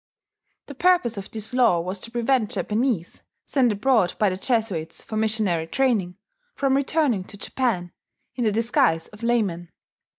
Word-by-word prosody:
The 285 - -9
purpose 345 -6 +2
of 195 - -6
this 220 +2 -7
law 235 -9 +4
was 185 +3 -4
to 230 - -9
prevent 240 -1 +1
Japanese, 215 -5 -1 0.2
sent 255 -4 +2
abroad 210 -3 +2
by 210 -3 +2
the - - -2
Jesuits 195 -7 -2
for 220 - -7
missionary 215 -7 0
training, 205 -6 0 0.4
from 275 -1 +1
returning 275 - +1
to 205 - -10
Japan 205 -7 -2 0.4
in 245 - -2
the 215 - +2
disguise 205 -7 +1
of 210 +1 -15
laymen. 205 -8 0
220 Hz, 155 wpm, -24 LUFS, 185-250 Hz, 0.4 s, law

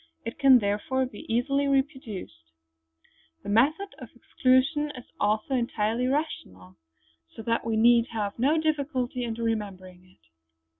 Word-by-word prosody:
It 230 - -6
can, 270 -2 +7
therefore, 215 +5 0
be 235 -3 -9
easily 275 +4 +1
reproduced; 265 - -3 0.9
the - - -7
method 295 - +2
of - - -10
exclusions 280 +4 +1
is 250 - -9 0.2
also 215 +5 0
entirely 235 -1 0
rational, 95 - -4 0.6
so 225 - -8
that 230 +1 0
we 225 -1 0
need 235 +1 +5
have 210 -1 -4
no 285 +6 +3
difficulty 280 -5 -1
in 230 -2 -3
remembering 200 -6 -4
it. 185 - -26
240 Hz, 135 wpm, -27 LUFS, 210-270 Hz, 0.9 s, can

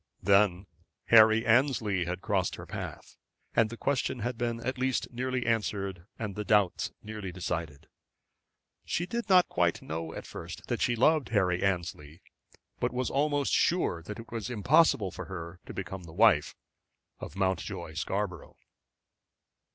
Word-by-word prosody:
Then 100 -1 +4 0.4
Harry 110 0 +7
Annesley 110 -7 +2
had 90 +2 -4
crossed 95 -4 0
her - - -9
path, - - -7 0.4
and 110 -1 +4
the 115 - -8
question 130 -2 -1
had 120 +3 -2
been 115 0 -2
at 130 0 -2
last 130 -1 0
nearly 130 0 -2
answered, 100 -5 -1
and 105 -3 -4
the 105 - -4
doubts 105 -3 +2
nearly 105 -3 -6
decided. 85 -5 -4 1.0
She 175 - -1
did 235 +3 -4
not 185 -2 +6
quite 85 -1 0
know 80 +1 -4
at - - -7
first - - -8
that - - -1
she 120 - +2
loved 145 +3 +3
Harry 90 -5 +1
Annesley, 85 -4 -2 0.6
but - - 0
was 125 0 -2
almost 145 0 +1
sure 170 - +2
that 105 +6 -7
it 115 -1 -11
was 115 0 -4
impossible 120 - +3
for - - -7
her 85 -2 -7
to - - -6
become 95 -1 -6
the 80 - -11
wife 100 -6 +4 0.6
of - - -8
Mountjoy 95 -3 -2
Scarborough. 95 +3 -3
105 Hz, 150 wpm, -29 LUFS, 90-120 Hz, 1.0 s, Harry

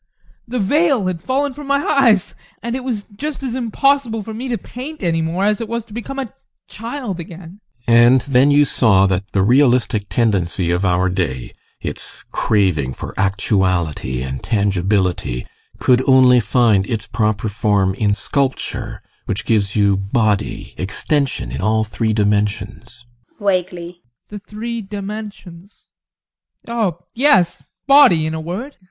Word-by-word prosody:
The 250 +2 -3
veil 270 - +2
had 180 -3 -3
fallen 275 - -1
from 290 +1 -9
my 280 +1 +1
eyes, 240 -10 +3 0.3
and 235 +1 -2
it 260 - -4
was 235 -6 -3
just 290 +4 -5
as 255 -3 -3
impossible 250 -1 0
for 220 - -7
me 240 +4 -5
to 240 - -1
paint 265 +4 -9
any 165 -2 +1
more 170 +4 -1
as 210 +1 +1
it 230 - -4
was 235 -1 -3
to 215 - -15
become 240 +4 -6
a 265 -5 -5 0.3
child 230 -4 -6
again. 170 +2 -10 0.3
GUSTAV. 115 - +2
And 120 +2 +6
then 135 +1 +3
you 145 0 +5
saw 100 -8 +3
that 95 +1 -1
the 95 - +1
realistic 120 -3 +2
tendency 95 -6 0
of 90 +2 0
our 90 -1 +2
day, 90 -10 -3 0.3
its - - -7
craving 90 -11 +1
for - - -7
actuality 90 - 0
and 65 0 -5
tangibility, 95 - 0 0.3
could 125 0 +3
only 130 -1 +6
find 110 -4 +2
its 110 -3 -3
proper 110 -1 -1
form 100 -2 +1
in 100 0 0
sculpture, 135 +5 -2 0.2
which - - -2
gives 100 -3 +1
you 100 -2 +3
body, 105 +1 -1
extension 105 - -1
in 65 - -4
all 110 +2 +2
three 110 +1 -2
dimensions 105 +3 -2 0.3
ADOLPH. 185 -4 +1
[Vaguely] 175 0 -10 0.3
The 210 - -7
three 225 +3 -6
dimensions 200 -2 -9 0.8
oh 215 -8 -1
yes, 210 - +3 0.2
body, 275 - +6
in 155 - -2
a 160 - -4
word! 200 - -6
140 Hz, 150 wpm, -18 LUFS, -, 0.8 s, And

